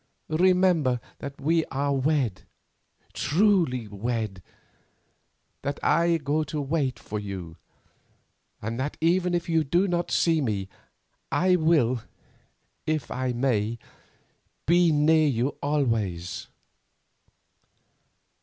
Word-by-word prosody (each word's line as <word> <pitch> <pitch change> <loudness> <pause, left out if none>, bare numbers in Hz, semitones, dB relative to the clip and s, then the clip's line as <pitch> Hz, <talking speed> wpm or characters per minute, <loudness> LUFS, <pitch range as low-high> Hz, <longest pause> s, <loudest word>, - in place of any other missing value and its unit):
Remember 175 -6 +3 0.2
that 140 0 -7
we 165 +2 +2
are 140 +1 -1
wed—truly 140 - -1
wed; 105 -2 -3 1.2
that 140 +1 -3
I 170 +1 +3
go 150 +1 0
to 150 0 -4
wait 140 -2 -1
for 105 - -5
you, 95 -5 -6 1.1
and 115 +3 -3
that 140 +3 -3
even 175 +2 +2
if 170 - -2
you 165 -2 +2
do 175 +7 +2
not 175 -1 -1
see 165 -2 +2
me, 100 -7 -2 0.6
I 185 +1 +3
will, 150 -8 +2 0.9
if 155 -5 -1
I 130 0 -1
may, 120 -3 0 0.9
be 170 +1 +4
near 155 +1 +4
you 125 -1 +1
always." 115 - -1
145 Hz, 100 wpm, -26 LUFS, 120-165 Hz, 1.2 s, be